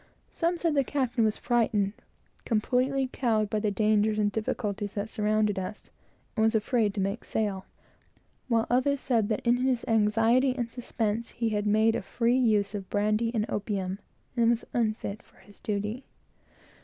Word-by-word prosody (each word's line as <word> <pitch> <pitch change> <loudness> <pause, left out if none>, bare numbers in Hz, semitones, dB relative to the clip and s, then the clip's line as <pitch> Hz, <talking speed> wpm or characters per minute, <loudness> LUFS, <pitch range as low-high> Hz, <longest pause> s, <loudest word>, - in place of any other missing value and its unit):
Some 345 +1 0
said 335 -2 0
that 285 - +2
the - - +3
captain 255 -4 0
was 215 -1 +1
frightened, 215 -5 +1 0.5
completely 255 +4 +1
cowed, 220 -5 +1
by 215 - +1
the 210 0 0
dangers 210 +1 +2
and 205 -1 +2
difficulties 205 -1 -3
that 205 +1 -3
surrounded 210 -2 +1
us, 190 +3 -7 0.4
and 220 - +2
was 220 +1 +3
afraid 215 -2 +1
to - - -2
make 195 +3 -2
sail; 200 -3 -2 0.8
while 230 -2 +2
others 265 +3 +2
said 230 -6 +1
that 215 +1 -2
in 240 +1 +4
his 255 -1 0
anxiety 225 +4 +3
and 240 -3 -3
suspense 230 -2 -2
he 230 -1 -1
had 210 -1 -1
made 220 +2 +3
a - - -1
free 235 +1 +1
use 210 -4 +2
of 200 -2 -6
brandy 215 +2 +1
and 215 -1 +1
opium, 195 -2 -3 0.4
and 230 -2 +3
was 235 -1 +1
unfit 215 -3 -1
for - - -27
his 205 +1 -18
duty. 210 +4 -3
220 Hz, 170 wpm, -28 LUFS, 210-240 Hz, 0.8 s, in